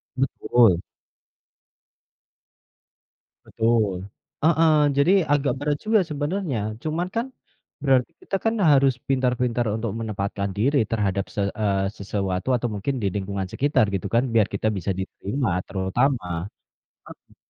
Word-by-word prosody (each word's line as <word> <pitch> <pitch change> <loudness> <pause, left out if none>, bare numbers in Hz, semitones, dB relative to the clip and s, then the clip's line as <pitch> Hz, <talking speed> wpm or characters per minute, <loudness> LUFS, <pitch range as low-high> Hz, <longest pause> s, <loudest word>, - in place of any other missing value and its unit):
Betul. 120 -7 +3 2.7
Betul. 110 -4 +1 0.5
Heeh. 160 0 +4 0.3
Jadi 140 +6 +4 0.2
agak 145 -1 +1
berat 145 0 0
juga 220 -1 +4
sebenarnya, 150 - -2 0.2
cuman 160 +3 -1
kan, 230 +1 0 0.6
berarti 130 -3 +3
kita 195 - -3
kan 225 - +3 0.2
harus 135 -1 +5 0.2
pintar-pintar 125 -2 +1
untuk 110 -1 -3
menempatkan 100 -2 -3
diri 135 +8 +2
terhadap 100 -3 0
se 105 - 0 0.2
eee, 100 -2 +1
sesuatu 100 +1 -2
atau 120 - -2
mungkin 105 +7 -2
di - - +2
lingkungan 100 -1 -3
sekitar, 140 -5 +2
gitu 95 - -3
kan, 120 - +4
biar 110 -3 +4
kita 100 +2 -1
bisa 95 +1 -2
diterima 100 +4 -2 0.2
terutama. 100 +6 0 0.9
Heeh. - - -28
120 Hz, 120 wpm, -24 LUFS, 100-140 Hz, 2.7 s, harus